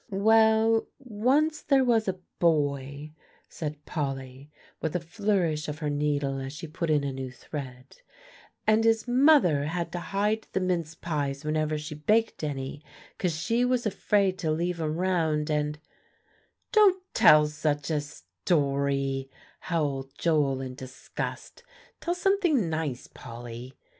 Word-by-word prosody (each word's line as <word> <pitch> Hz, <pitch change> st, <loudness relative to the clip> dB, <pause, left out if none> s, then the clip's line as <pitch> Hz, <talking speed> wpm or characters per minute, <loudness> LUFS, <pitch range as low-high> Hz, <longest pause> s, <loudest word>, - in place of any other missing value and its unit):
"Well, 220 Hz, +2 st, +4 dB
once 270 Hz, +6 st, +1 dB
there 275 Hz, -2 st, +3 dB
was 230 Hz, -4 st, +2 dB
a 190 Hz, -1 st, -1 dB, 0.2 s
boy," 145 Hz, -2 st, 0 dB, 0.4 s
said 150 Hz, -2 st, -6 dB
Polly, 135 Hz, -2 st, -4 dB, 0.3 s
with 160 Hz, 0 st, -2 dB
a -, -, +2 dB
flourish 175 Hz, -3 st, -1 dB
of 150 Hz, 0 st, -4 dB
her 150 Hz, -2 st, -2 dB
needle 145 Hz, -2 st, 0 dB
as 135 Hz, +1 st, -6 dB
she 150 Hz, -, -7 dB
put 165 Hz, +1 st, -4 dB
in 150 Hz, -2 st, +3 dB
a 140 Hz, -1 st, -2 dB
new 130 Hz, -1 st, -5 dB
thread; 130 Hz, -1 st, -9 dB, 0.7 s
"and 215 Hz, +1 st, +4 dB
his 225 Hz, +1 st, +2 dB
mother 245 Hz, -, +5 dB
had 170 Hz, +2 st, -3 dB
to 175 Hz, -, -3 dB
hide 205 Hz, +4 st, -1 dB
the -, -, +1 dB
mince 170 Hz, -4 st, -1 dB
pies 145 Hz, -3 st, -3 dB
whenever 155 Hz, 0 st, 0 dB
she 150 Hz, 0 st, -6 dB
baked 210 Hz, +8 st, +1 dB
any, 140 Hz, 0 st, -4 dB, 0.4 s
'cause 170 Hz, -4 st, -1 dB
she 230 Hz, +7 st, +1 dB
was 250 Hz, -1 st, +1 dB
afraid 195 Hz, -2 st, +1 dB
to 160 Hz, -, -1 dB
leave 170 Hz, +2 st, -1 dB
'em 155 Hz, 0 st, -1 dB
round, 160 Hz, -4 st, 0 dB
and" 150 Hz, 0 st, 0 dB, 0.9 s
"Don't 400 Hz, -5 st, +5 dB
tell 150 Hz, 0 st, +7 dB
such 150 Hz, -1 st, -2 dB
a 150 Hz, -2 st, +1 dB
story," 135 Hz, -, -1 dB, 0.3 s
howled 140 Hz, -6 st, -2 dB
Joel 145 Hz, -5 st, +1 dB
in 130 Hz, -1 st, -5 dB
disgust; 130 Hz, 0 st, -7 dB, 0.4 s
"tell 345 Hz, -, -1 dB
something 355 Hz, -, +2 dB
nice, 155 Hz, -6 st, -3 dB
Polly." 120 Hz, +1 st, -10 dB
155 Hz, 140 wpm, -27 LUFS, 140-205 Hz, 0.9 s, tell